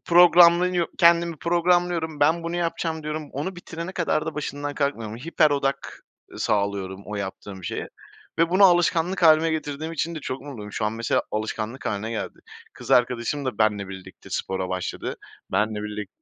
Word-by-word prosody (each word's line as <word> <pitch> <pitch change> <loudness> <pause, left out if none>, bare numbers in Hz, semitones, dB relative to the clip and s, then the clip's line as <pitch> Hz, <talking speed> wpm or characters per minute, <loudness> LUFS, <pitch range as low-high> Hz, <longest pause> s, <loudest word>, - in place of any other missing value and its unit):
programlanıyor 175 0 +6
kendimi 170 -1 +4
programlıyorum, 170 -2 +1
"Ben 160 +3 +3
bunu 170 +1 -3
yapacağım." 165 -2 -2
diyorum. 150 0 -5
Onu 165 +7 -4
bitirene 170 +1 -7
kadar 160 -3 0
da 160 - -3
başından 145 -1 -4
kalkmıyorum. 115 -7 -2
Hiper 155 +3 +2
odak 140 -1 -2 0.3
sağlıyorum 100 -2 -1
o 105 0 -5
yaptığım 95 -1 -6
şeye - - -4 0.5
ve 165 0 +3
bunu 190 +3 +6
alışkanlık 175 0 +3
hâline 160 0 +6
getirdiğim 155 0 -3
için 165 +2 -2
de 155 - -5
çok 130 0 -5
mutluyum. 110 -8 -8
Şu 110 - -2
an 105 - 0
mesela 115 0 0
alışkanlık 110 +3 -4
hâline 110 +2 -2
geldi. 115 - -5 0.3
Kız - - -10
arkadaşım 125 +3 +2
da 130 - -3
benle 105 -3 +1
birlikte 95 -1 -11
spora 95 -1 -2
başladı, 95 -1 -4 0.4
benle 105 +2 0
birlik 105 -2 -5
145 Hz, 160 wpm, -24 LUFS, 110-170 Hz, 0.5 s, programlanıyor